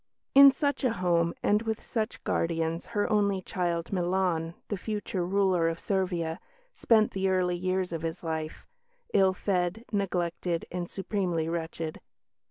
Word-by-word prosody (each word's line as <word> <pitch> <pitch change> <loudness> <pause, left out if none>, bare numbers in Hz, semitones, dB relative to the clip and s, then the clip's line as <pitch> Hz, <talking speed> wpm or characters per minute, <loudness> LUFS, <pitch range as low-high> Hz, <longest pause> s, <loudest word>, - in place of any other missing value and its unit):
In 275 0 +10
such 285 +1 -1
a 250 -4 +2
home 170 -3 +1
and 210 +1 +3
with 225 -1 -2
such 220 -1 -3
guardians 165 0 -1
her 205 - +2
only 200 -2 +2
child, 175 -1 -2
Milan, 175 -2 0
the 205 - -2
future 205 -2 -3
ruler 185 -2 +2
of 165 0 -4
Servia, 180 -4 -1 0.3
spent 220 - +3
the 190 0 0
early 180 -1 +1
years 185 0 -1
of 165 - -3
his 165 +2 -4
life 160 -1 -4 0.5
ill 190 -2 +4
fed, 185 +3 -1
neglected, 175 -4 -1
and 175 -1 -4
supremely 185 -5 -1
wretched. 165 -1 -4
180 Hz, 145 wpm, -28 LUFS, 170-200 Hz, 0.5 s, In